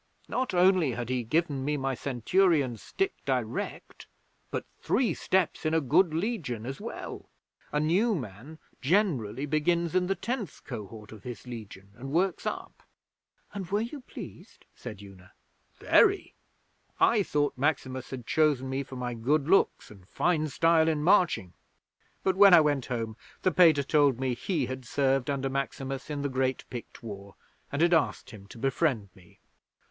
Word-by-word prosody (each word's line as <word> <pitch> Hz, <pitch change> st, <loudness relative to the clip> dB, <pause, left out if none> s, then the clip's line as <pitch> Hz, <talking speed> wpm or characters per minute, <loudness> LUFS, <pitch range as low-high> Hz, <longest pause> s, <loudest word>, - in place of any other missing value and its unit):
Not 255 Hz, -7 st, -2 dB
only 180 Hz, -6 st, +4 dB
had 120 Hz, 0 st, -4 dB
he 130 Hz, -1 st, 0 dB
given 145 Hz, +2 st, 0 dB
me 150 Hz, +2 st, 0 dB
my 135 Hz, -1 st, -1 dB
Centurion's 135 Hz, -, +1 dB
stick 390 Hz, 0 st, -1 dB
direct, -, -, -3 dB, 0.4 s
but -, -, -3 dB
three 235 Hz, -10 st, +1 dB
steps 185 Hz, +2 st, 0 dB
in 155 Hz, 0 st, +1 dB
a -, -, +4 dB
good 160 Hz, +5 st, +3 dB
Legion 160 Hz, -, -2 dB
as 135 Hz, +2 st, -6 dB
well! -, -, -7 dB, 0.4 s
A 150 Hz, -, +1 dB
new 190 Hz, +9 st, +2 dB
man 125 Hz, -, -7 dB, 0.2 s
generally 140 Hz, -, +1 dB
begins 165 Hz, +3 st, +1 dB
in 185 Hz, -1 st, +2 dB
the 195 Hz, -, +1 dB
Tenth 230 Hz, +1 st, -4 dB
Cohort 105 Hz, -3 st, -8 dB
of 110 Hz, -2 st, -11 dB
his 115 Hz, -3 st, -8 dB
Legion, 105 Hz, -5 st, -9 dB
and 135 Hz, +4 st, -8 dB
works 180 Hz, +4 st, 0 dB
up.' -, -, -5 dB, 0.7 s
'And 195 Hz, -4 st, -5 dB
were 205 Hz, +2 st, +1 dB
you 250 Hz, +5 st, -5 dB
pleased?' -, -, -11 dB
said 105 Hz, -5 st, -9 dB
Una. 95 Hz, -2 st, -15 dB, 0.4 s
'Very. -, -, +3 dB, 0.7 s
I 225 Hz, -3 st, +4 dB
thought 145 Hz, -6 st, 0 dB
Maximus 130 Hz, -2 st, -1 dB
had 125 Hz, -3 st, -7 dB
chosen 145 Hz, -4 st, +2 dB
me 135 Hz, +1 st, -1 dB
for 135 Hz, -1 st, -9 dB
my 125 Hz, -1 st, -3 dB
good 135 Hz, +6 st, +1 dB
looks 195 Hz, -, +2 dB
and 95 Hz, -3 st, -15 dB
fine 160 Hz, -3 st, +1 dB
style 165 Hz, +2 st, +3 dB
in 155 Hz, -2 st, +1 dB
marching, 170 Hz, -, +3 dB, 0.7 s
but, 190 Hz, -1 st, +2 dB
when 195 Hz, -2 st, +8 dB
I -, -, +9 dB
went 145 Hz, -4 st, 0 dB
home, 115 Hz, -3 st, -3 dB, 0.3 s
the 185 Hz, -, +3 dB
Pater 160 Hz, -5 st, +5 dB
told 140 Hz, -3 st, +3 dB
me 130 Hz, -1 st, 0 dB
he 145 Hz, +3 st, -1 dB
had 130 Hz, +1 st, -6 dB
served 135 Hz, +1 st, +1 dB
under 135 Hz, -1 st, -1 dB
Maximus 135 Hz, 0 st, -4 dB
in 145 Hz, -1 st, -3 dB
the -, -, +1 dB
great 130 Hz, -1 st, -1 dB
Pict 120 Hz, -1 st, -8 dB
War, 100 Hz, -3 st, -8 dB, 0.4 s
and 145 Hz, +4 st, +1 dB
had 175 Hz, 0 st, +4 dB
asked 160 Hz, -3 st, +1 dB
him 100 Hz, -3 st, -12 dB
to 100 Hz, -, -12 dB
befriend 130 Hz, -4 st, 0 dB
me.' 90 Hz, -2 st, -20 dB
140 Hz, 165 wpm, -28 LUFS, 125-170 Hz, 0.7 s, I